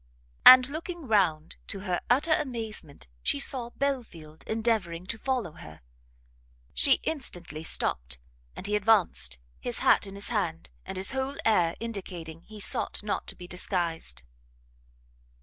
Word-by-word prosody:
and, 255 0 +11
looking 335 +3 -6
round, 175 -8 +2
to 195 - -4
her 180 -3 -1
utter 285 +7 +4
amazement 220 - -3 0.2
she 105 - 0
saw 240 - +1
Belfield 230 - -4
endeavouring 220 -7 0
to 225 +4 -3
follow 255 - -1
her. 80 - -12 0.9
She 65 +1 +5
instantly 175 - -4
stopt, 60 - 0 0.4
and - - -8
he 210 +1 0
advanced, 190 - +2 0.2
his - - -2
hat - - +4
in 195 - -9
his 200 - -4
hand, 175 -8 -2 0.2
and 190 0 -5
his 190 +1 0
whole 265 +1 -2
air 175 -7 +3
indicating 180 -8 -6
he 215 +4 -12
sought 205 - 0
not 210 - -2
to - - -6
be 180 - -10
disguised. 170 - -2
195 Hz, 140 wpm, -28 LUFS, 165-235 Hz, 0.9 s, and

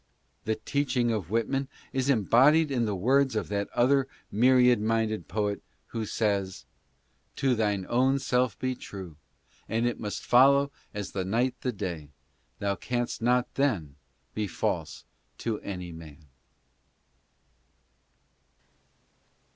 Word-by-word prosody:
The 110 - +1
teaching 130 -4 0
of 105 -7 -3
Whitman 125 +5 0 0.3
is 135 0 0
embodied 140 - +4
in 120 -3 +1
the 105 -2 -1
words 130 +6 +2
of 110 - -2
that 100 -1 -2
other 135 +2 +3 0.2
myriad 125 +1 +5
minded 110 -4 0
poet 105 +1 -1 0.3
who 110 -2 -4
says, 100 -4 -1 0.3
" - - -43
To 135 -2 +2
thine 105 -4 0
own 130 +3 +3
self 125 -5 0
be 130 0 -1
true, 95 -9 -9 0.5
And 115 +2 0
it 120 - -1
must 105 -2 -5
follow 140 +3 +5 0.2
as 105 -1 -5
the 95 - -2
night 115 +7 +1
the 125 - -1
day, 90 -9 -5 0.5
Thou 100 -1 -1
canst 120 +3 -3
not 125 +1 +1
then 95 - 0 0.4
be 105 -1 -2
false 85 - -3 0.3
to 110 -2 -2
any 90 -3 -6
man." 80 -2 -12
115 Hz, 130 wpm, -28 LUFS, 100-130 Hz, 0.5 s, myriad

